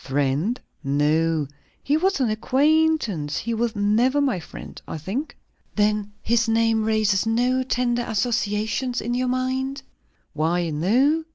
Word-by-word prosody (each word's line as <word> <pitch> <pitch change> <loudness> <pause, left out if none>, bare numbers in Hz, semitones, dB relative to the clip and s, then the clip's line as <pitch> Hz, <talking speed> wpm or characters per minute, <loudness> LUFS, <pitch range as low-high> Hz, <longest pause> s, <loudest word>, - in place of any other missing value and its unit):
"Friend? 145 - 0 0.2
No. 150 +2 +1 0.4
He 285 - +1
was 375 +1 +1
an 245 -5 +1
acquain'tance; 270 - +1
he 230 - -2
was 230 0 -1
never 220 +7 +2
my 265 -10 +1
friend, 160 - -10
I - - -5
think." 205 - -4 0.4
"Then 210 0 +1
his 230 0 +2
name 225 0 +2
raises 215 -2 +2
no 245 +3 +2
tender 245 -1 0
associations 220 +2 -1
in 240 +2 -3
your 250 +1 0
mind?" 260 +2 -2 0.5
"Why, 165 +2 0
no!" 255 - +2
225 Hz, 130 wpm, -23 LUFS, 195-255 Hz, 0.5 s, never